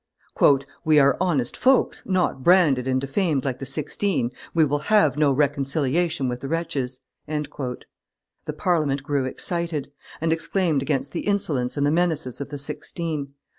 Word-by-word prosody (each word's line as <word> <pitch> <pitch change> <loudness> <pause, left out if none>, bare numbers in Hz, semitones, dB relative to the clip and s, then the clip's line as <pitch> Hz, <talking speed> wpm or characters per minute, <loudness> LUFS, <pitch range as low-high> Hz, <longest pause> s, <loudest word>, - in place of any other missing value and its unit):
"We 155 -2 +4
are 140 -1 +5
honest 150 -10 0
folks, 260 0 +2
not 180 -8 0
branded 155 -8 +4
and 130 0 +1
defamed 140 0 0
like 130 -2 -2
the 135 - -5
Sixteen; 155 -4 -1 0.2
we 160 -2 +4
will 145 0 0
have 205 -11 +4
no 150 -1 +3
reconciliation 140 +2 0
with 125 0 -3
the 135 - -6
wretches." 145 -5 -3 0.3
The 145 -4 -7
Parliament 150 -6 +1
grew 140 -2 0
excited, 165 +1 -2 0.3
and 160 0 +1
exclaimed 165 -3 0
against 140 0 -1
the 170 - -4
insolence 150 -11 0
and 145 - +2
the 145 - +2
menaces 160 -6 0
of 140 - -5
the 145 - -5
Sixteen. 145 0 -5
145 Hz, 150 wpm, -24 LUFS, 135-170 Hz, 0.3 s, are